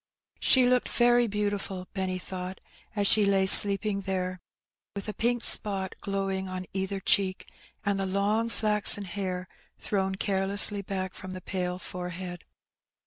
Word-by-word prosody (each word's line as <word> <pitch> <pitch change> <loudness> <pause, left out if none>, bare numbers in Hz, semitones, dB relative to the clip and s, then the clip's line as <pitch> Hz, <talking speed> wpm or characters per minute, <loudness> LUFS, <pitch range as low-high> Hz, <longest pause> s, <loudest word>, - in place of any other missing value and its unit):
She 260 -2 +3
looked 250 0 0
very 240 0 +1
Roughing 210 0 -5
It. - - 0
25 205 - -5
beantifal^ 185 -2 -8
Benny 190 -1 -4
thought, 185 0 -9 0.4
as 205 -1 -2
she 210 +1 +3
lay 195 -1 +1
sleeping 200 +1 +6
there, 185 -1 -5 0.6
with 200 +1 -8
a 210 - -6
pink 240 +2 -3
spot 195 -3 +6
glowing 195 -1 -5
on 185 0 -7
either 190 +1 -5
cheek, 190 0 -2 0.3
and 200 -1 -2
the 195 - -3
long 205 +4 -2
flaxen 210 -2 +2
hair 185 -1 -6 0.3
thrown 190 -2 -4
carelessly 200 +1 +5
back 190 -1 -6
from 185 0 -11
the 185 - -8
pale 180 -1 -5
forehead. 180 -1 -9
195 Hz, 155 wpm, -25 LUFS, 185-205 Hz, 0.6 s, sleeping